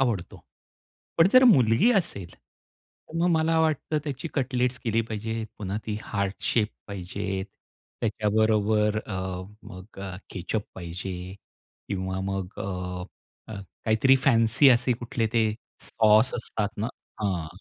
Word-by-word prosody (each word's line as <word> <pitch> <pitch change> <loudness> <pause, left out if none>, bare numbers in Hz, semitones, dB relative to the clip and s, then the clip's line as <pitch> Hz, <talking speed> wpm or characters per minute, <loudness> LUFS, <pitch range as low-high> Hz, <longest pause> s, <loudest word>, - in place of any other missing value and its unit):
आवडतो. 115 -9 -1 0.8
पण 165 +2 +7
जर 255 0 +8
मुलगी 155 - +5
असेल, 100 - -2
तर 165 - -17
मग 175 +1 +3
मला 160 +1 +2
वाटतं 155 -1 +1
त्याची 145 +2 -4
कटलेट्स 125 -2 0
केली 115 -1 +2
पाहिजे. 110 0 -3
पुन्हा 100 -1 -3
ती 105 -1 -2
हार्ट 100 -2 -2
शेप 110 -3 +2 0.2
पाहिजे. 95 0 -4 0.6
त्याच्याबरोबर 105 0 +2
अ, - - -6 0.5
मग 95 +3 -12
अ, 95 -2 -5
केचअप 100 +3 -3
पाहिजे 90 +1 -6 0.5
किंवा 95 -1 -2
मग 95 -1 -3
अ, 90 -2 -4 0.8
काहीतरी 115 +4 +5
फॅन्सी 115 +2 +5
असे 125 0 +4
कुठले 120 -1 -2
ते 115 -1 +3 0.4
सॉस 110 +2 +4
असतात 110 -3 -2
ना 110 +3 -1 0.3
हां. 95 -6 -1
110 Hz, 125 wpm, -26 LUFS, 95-125 Hz, 0.8 s, जर